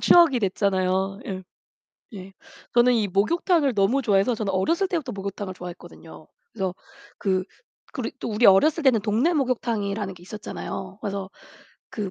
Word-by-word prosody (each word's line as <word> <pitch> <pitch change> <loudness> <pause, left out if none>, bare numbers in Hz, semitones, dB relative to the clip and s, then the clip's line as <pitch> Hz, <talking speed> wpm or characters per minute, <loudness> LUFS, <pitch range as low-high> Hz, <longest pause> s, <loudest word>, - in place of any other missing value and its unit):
추억이 335 -7 +6
됐잖아요. 190 0 0
예. 190 -1 -5 0.7
예. 195 -1 -9 0.4
저는 245 +1 +5
이 215 -3 +1
목욕탕을 280 - +2
너무 205 +7 +2
좋아해서 210 +1 +2
저는 210 -3 -2
어렸을 330 - +1
때부터 310 -9 -2
목욕탕을 195 -1 -5
좋아했거든요. 175 -3 -11 0.3
그래서 190 -4 -3 0.4
그 190 -2 0 0.5
그리고 - - -5
또 - - -3
우리 220 +2 +3
어렸을 295 - +5
때는 255 -6 +4
동네 220 - +1
목욕탕이라는 220 -7 -1
게 175 - -16
있었잖아요. 190 -1 -7
그래서 195 -1 -4 0.6
그 205 -3 -4
200 Hz, 360 characters per minute, -24 LUFS, 190-245 Hz, 0.7 s, 추억이